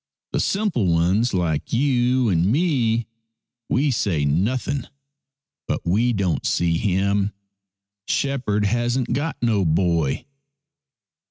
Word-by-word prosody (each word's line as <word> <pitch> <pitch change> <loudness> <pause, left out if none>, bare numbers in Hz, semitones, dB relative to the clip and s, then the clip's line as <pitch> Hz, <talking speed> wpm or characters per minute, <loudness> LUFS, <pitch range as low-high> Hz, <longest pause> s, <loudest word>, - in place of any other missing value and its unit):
The - - -1
simple 195 - 0
ones 90 +8 +2
like 85 -5 -1
you 125 -1 +2
and 90 +2 +2
me, 120 -7 +1 0.6
we 140 +3 +2
say 90 - 0
nothing, 120 - -1 0.8
but - - -1
we 110 +8 +2
don't 100 -6 -1
see 85 -1 +1
him. 100 0 0 0.7
Shepherd 125 -7 0
hasn't 120 +3 0
got 145 +3 -2
no 110 -4 +2
boy." 85 -4 +1
110 Hz, 105 wpm, -22 LUFS, 90-125 Hz, 0.8 s, ones